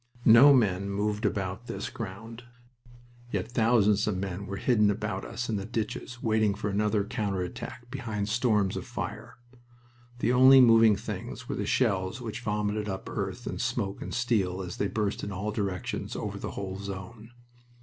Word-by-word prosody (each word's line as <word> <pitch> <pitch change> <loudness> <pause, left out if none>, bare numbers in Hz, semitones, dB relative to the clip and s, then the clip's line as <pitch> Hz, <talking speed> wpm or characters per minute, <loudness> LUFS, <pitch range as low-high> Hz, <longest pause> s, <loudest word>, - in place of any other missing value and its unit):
No 120 +6 +9
men 100 -7 +2
moved 105 +2 0
about 100 +3 -3
this 120 - -5
ground. 115 0 -7 0.9
Yet 100 +3 -2
thousands 110 -3 +3
of 105 -3 0
men 95 +1 -4
were 100 - -4
hidden 105 -3 +3
about 105 -2 -2
us 120 +2 -4
in 110 - -1
the 100 - -4
ditches, 120 +2 -4
waiting 110 -2 +2
for 105 0 -3
another 105 +1 +1
counter 100 -3 -2
attack 120 +7 -8
behind 110 -6 -3
storms 105 -4 +1
of - - -5
fire. - - -6 0.8
The 120 0 +1
only 130 +1 +8
moving 115 -3 +7
things - - -6
were - - -3
the - - -3
shells 95 +3 +1
which 120 0 -6
vomited 105 -1 -1
up 95 -1 -5
earth - - -4
and - - -4
smoke 100 0 -2
and - - -6
steel 100 -7 0
as 90 -1 -7
they 100 - 0
burst 105 0 -2
in 100 - -4
all 100 +3 -3
directions 100 -4 -3
over - - -4
the - - -5
whole 95 -1 -5
zone. 100 +3 -8
105 Hz, 170 wpm, -28 LUFS, 100-115 Hz, 0.9 s, No